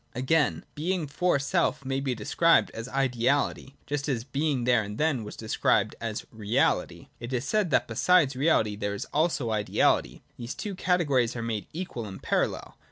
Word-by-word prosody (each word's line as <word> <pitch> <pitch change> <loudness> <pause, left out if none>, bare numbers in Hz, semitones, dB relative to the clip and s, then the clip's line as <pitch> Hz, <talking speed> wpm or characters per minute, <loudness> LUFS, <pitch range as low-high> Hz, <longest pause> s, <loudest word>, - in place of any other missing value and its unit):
— - - -37
Again, 140 +5 +1
Being 170 +2 -1
for 175 +4 +1
self 140 0 0
may 135 0 -1
be 135 -2 -2
described 165 +10 +3
as 115 +1 -7
ideality, 135 +1 0
just 145 0 -3
as 120 -5 -1
Being 140 0 -1
there 120 -1 +3
and 105 0 -6
then 150 -6 +1
was 105 - -8
described 110 -1 +1
as 115 -2 -4
realit 110 +4 +1
y. - - -14
/ - - -38
It 120 +1 -7
is 125 0 -1
said, 215 -4 +1
that - - +2
besides 140 +4 +3
reality 125 -7 +2
there 100 0 -3
is - - -5
also 150 -6 +1
an 110 - +1
ideality. 80 -10 +1 0.2
Thus 120 +1 -5
the - - -7
two 205 -2 -4
categories 145 -11 +1
are 115 - -4
made 110 -3 -3
equal 160 - -5
and 95 -1 -8
parallel. - - -2
130 Hz, 195 wpm, -27 LUFS, 115-155 Hz, 0.2 s, described